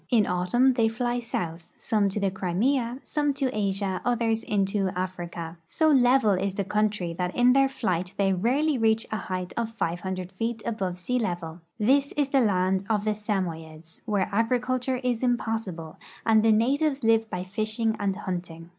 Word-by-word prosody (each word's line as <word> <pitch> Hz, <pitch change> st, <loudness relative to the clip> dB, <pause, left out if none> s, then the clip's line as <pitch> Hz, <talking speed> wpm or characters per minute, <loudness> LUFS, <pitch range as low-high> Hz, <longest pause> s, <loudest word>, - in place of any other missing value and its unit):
In 225 Hz, -5 st, +4 dB
autumn 185 Hz, +10 st, +2 dB
they 230 Hz, -3 st, +2 dB
fly 240 Hz, +2 st, -1 dB
south 170 Hz, -8 st, -4 dB
— -, -, -35 dB
some 210 Hz, -3 st, +1 dB
to 195 Hz, -, -3 dB
the 200 Hz, -1 st, 0 dB
Crimea, 230 Hz, +7 st, 0 dB
some 295 Hz, -2 st, 0 dB
to 265 Hz, -4 st, -1 dB
Asia, 195 Hz, -2 st, -1 dB
others 230 Hz, -2 st, +1 dB
into 195 Hz, -2 st, 0 dB
Africa. 175 Hz, -2 st, -5 dB
So 315 Hz, -, +2 dB
level 255 Hz, -5 st, +5 dB
is 195 Hz, 0 st, 0 dB
the 200 Hz, -, -1 dB
countr}'^ 210 Hz, -4 st, 0 dB
that 180 Hz, 0 st, -2 dB
in 245 Hz, +1 st, +5 dB
their 270 Hz, 0 st, +4 dB
flight 185 Hz, -9 st, -2 dB
they 195 Hz, -1 st, +2 dB
rarely 260 Hz, -, +1 dB
reach 225 Hz, 0 st, +2 dB
a 215 Hz, -, -1 dB
lieight 185 Hz, -1 st, -3 dB
of 230 Hz, -1 st, -2 dB
500 185 Hz, +1 st, -3 dB
feet 225 Hz, +3 st, -3 dB
above 195 Hz, -6 st, -2 dB
sea 250 Hz, +8 st, -1 dB
level. 175 Hz, -6 st, -4 dB, 0.2 s
This 270 Hz, +6 st, +2 dB
is 290 Hz, -2 st, 0 dB
the 270 Hz, -1 st, +3 dB
land 190 Hz, -3 st, +2 dB
of 210 Hz, -1 st, +1 dB
the 215 Hz, -, +2 dB
Samoyeds, 165 Hz, -6 st, -4 dB
where 205 Hz, -4 st, 0 dB
agriculture 250 Hz, +3 st, 0 dB
is 245 Hz, -2 st, 0 dB
impossi 225 Hz, -6 st, -1 dB
ble, 160 Hz, -1 st, -10 dB, 0.3 s
and 220 Hz, -1 st, +5 dB
the 225 Hz, 0 st, +4 dB
natives 275 Hz, +5 st, +2 dB
live 225 Hz, 0 st, +3 dB
by 180 Hz, -2 st, -3 dB
Ashing 215 Hz, +3 st, -1 dB
and 200 Hz, -2 st, 0 dB
hunting. 175 Hz, -4 st, -6 dB
215 Hz, 180 wpm, -26 LUFS, 185-240 Hz, 0.3 s, level